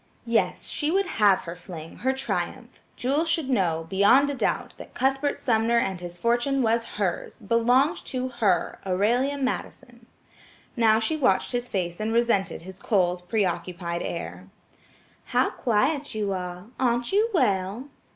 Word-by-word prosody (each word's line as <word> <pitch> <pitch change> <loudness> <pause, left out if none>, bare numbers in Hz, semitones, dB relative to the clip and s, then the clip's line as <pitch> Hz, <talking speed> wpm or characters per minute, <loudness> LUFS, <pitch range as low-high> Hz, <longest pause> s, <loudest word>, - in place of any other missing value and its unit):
Yes, 230 -1 0
she 300 - -1
would 390 +4 +2
have 210 - +3
her 170 0 -6
fling, 170 -3 -10
her 260 - +1
triumph; 265 0 -4
Jewel 275 +6 +1
should 325 -5 0
know, 165 -8 +1
beyond 205 +10 +4
a - - -3
doubt, 270 - -1
that - - -11
Cuthbert 270 +2 +1
Sumner 230 0 +2
and 190 -6 0
his 175 0 -7
fortune 240 +6 +1
was 230 0 +1
hers, 190 -4 -2
belonged 245 - +2
to 255 -1 -3
her–Aurelia 225 +4 0
Madison. 260 -2 -5 0.7
Now 225 -3 +4
she 225 +8 0
watched 195 -11 +2
his 245 0 -2
face 175 -3 -2
and 215 +1 -1
resented 230 -7 +1
his 190 +2 -11
cold, 180 -4 0
preoccupied 175 -3 -1
air. 90 - -5 0.8
"How - - +1
quiet 265 +4 0
you 205 -2 -1
are; 180 0 -5
aren't 240 -1 +1
you 425 +4 +3
well?" 200 - +1
225 Hz, 145 wpm, -25 LUFS, 185-260 Hz, 0.8 s, beyond